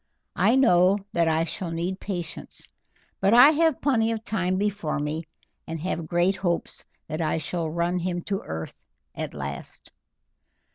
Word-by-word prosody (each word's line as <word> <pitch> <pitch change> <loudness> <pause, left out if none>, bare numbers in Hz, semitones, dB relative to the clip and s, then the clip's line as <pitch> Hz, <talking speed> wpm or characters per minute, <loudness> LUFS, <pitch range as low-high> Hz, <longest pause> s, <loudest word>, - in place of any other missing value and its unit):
I 235 - +5
know 190 -7 +5 0.2
that 170 -1 +2
I 160 0 +2
shall 170 +2 -4
need 175 +3 -3
patience, 175 -5 -6 0.5
but 195 +4 +4
I 260 +5 +9
have 320 -2 +2
plenty 230 -5 +2
of 225 -1 -3
time 185 -4 -1
before 205 -6 -1
me, 150 +3 -3 0.4
and 165 0 -4
have 165 -2 -3
great 175 +3 +2
hopes 175 -3 -2 0.2
that 155 +2 -3
I 160 0 0
shall 165 0 -3
run 170 +2 0
him 175 0 -2
to 195 -2 -2
earth 80 0 -6 0.4
at - - -5
last." 70 0 -7
175 Hz, 155 wpm, -25 LUFS, 165-200 Hz, 0.5 s, I